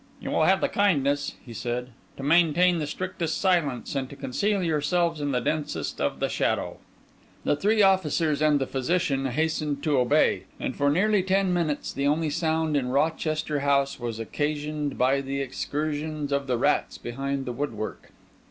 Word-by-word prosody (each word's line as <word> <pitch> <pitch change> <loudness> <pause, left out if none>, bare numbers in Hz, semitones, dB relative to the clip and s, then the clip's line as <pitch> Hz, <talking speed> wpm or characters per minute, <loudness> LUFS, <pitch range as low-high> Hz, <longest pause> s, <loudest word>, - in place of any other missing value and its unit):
"You - - -5
will - - +3
have - - +4
the - - +3
kindness," 145 -8 +1
he 120 - -9
said, 125 +2 -3 0.3
"to 135 - -7
maintain 170 +3 +4
the 150 - -2
strictest 170 0 -3
silence, 165 - +1
and 135 -2 -2
to 140 - -10
conceal 185 +9 -1
yourselves 165 +1 +1
in 145 -1 -1
the 125 - +1
densest 150 +4 -2
of - - -1
the - - +1
shadow." - - -1 0.7
The - - +2
three 210 +7 +3
officers 165 -5 +2
and 155 -1 +4
the 135 - 0
physician 135 0 0
hastened 150 +1 -1
to 145 -4 +2
obey, 125 -1 +2
and - - -3
for 145 0 +2
nearly 200 +6 +3
ten 190 0 +1
minutes 160 -4 -1
the 140 +1 0
only 155 +1 +1
sound 160 0 0
in 130 -3 0
Rochester 155 +1 0
House 140 -1 +1
was 120 -2 -4
occasioned 150 +4 -2
by 135 +2 +3
the 140 0 -3
excursions 150 +2 -3
of 140 -1 -1
the 125 -2 +1
rats 145 +5 +1
behind 135 +3 -3
the 125 - -3
woodwork. 115 -5 -5
145 Hz, 170 wpm, -26 LUFS, 135-160 Hz, 0.7 s, have